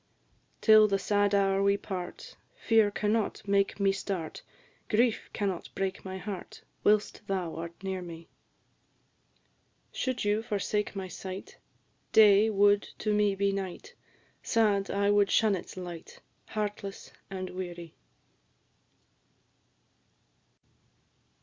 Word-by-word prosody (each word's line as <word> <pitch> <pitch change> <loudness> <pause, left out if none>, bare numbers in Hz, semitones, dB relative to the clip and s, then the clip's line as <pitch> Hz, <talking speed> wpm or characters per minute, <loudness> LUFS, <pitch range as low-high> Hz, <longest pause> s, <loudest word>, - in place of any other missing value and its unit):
Till 215 -1 +7
the 200 -1 +1
sad 205 0 +1
hour 195 -1 +2
we 200 0 +3
part, 180 -3 -7 0.2
Fear 220 -2 +3
cannot 210 0 -1
make 200 0 +1
me 195 -1 +3
start; 190 -4 -4 0.5
Grief 230 +1 +1
cannot 195 -4 -3
break 195 0 -2
my 190 0 -6
heart 190 0 -7 0.2
Whilst 210 0 +2
thou 185 -4 -2
art 170 +2 -8
near 190 -1 -3
me. 170 -1 -9 1.6
Should 255 -4 -2
you 205 +1 +2
forsake 210 -1 -2
my 190 -1 -4
sight, 185 +2 -8 0.5
Day 210 0 +7
would 205 0 +4 0.2
to 215 - -1
me 210 -1 +2
be 200 0 +1
night; 195 -2 -5 0.5
Sad, 205 -4 +2
I 200 +1 +1
would 205 -1 +4
shun 215 -2 +3
its 185 0 -6
light, 175 -3 -8 0.3
Heartless 205 -2 -5 0.2
and 185 -1 -5
weary. 175 -2 -7
200 Hz, 115 wpm, -29 LUFS, 190-210 Hz, 1.6 s, Till